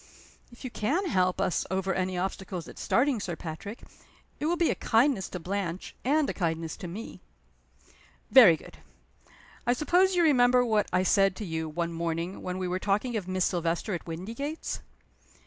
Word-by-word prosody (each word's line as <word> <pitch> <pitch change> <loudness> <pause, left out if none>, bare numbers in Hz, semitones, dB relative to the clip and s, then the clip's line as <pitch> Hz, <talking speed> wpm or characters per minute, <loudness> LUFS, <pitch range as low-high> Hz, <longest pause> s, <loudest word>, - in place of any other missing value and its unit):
"If 240 - -14
you 255 - -5
can 295 - 0
help 185 -6 +1
us - - +1
over 190 0 0
any 185 -1 -1
obstacles 185 -1 -4
at - - -11
starting, 260 -1 +2
Sir 180 -4 -4
Patrick, 170 +8 -7 0.6
it 300 - -1
will 345 +2 +1
be 340 -1 +3
a - - +2
kindness 230 -3 +2
to 180 - -5
Blanche, 185 0 -4
and 295 +3 +2
a - - -2
kindness 165 -3 -2
to 190 - -7
me." 200 +7 -8 1.1
"Very 210 -12 +9
good. - - -14 0.9
I 245 - +5
suppose 360 +8 +3
you 350 - +4
remember 250 -4 +5
what 215 -3 +2
I 185 +1 +2
said 195 0 +3
to 210 - -5
you, 160 -2 -3
one 170 +2 -2
morning, 170 +2 -3
when 180 0 -4
we 185 -1 -2
were 180 +1 -1
talking 210 +5 0
of 200 -4 -3
Miss 185 -1 +1
Silvester 175 +3 -1
at 175 - -5
Windygates?" 230 - -4
190 Hz, 180 wpm, -28 LUFS, 175-245 Hz, 1.1 s, Very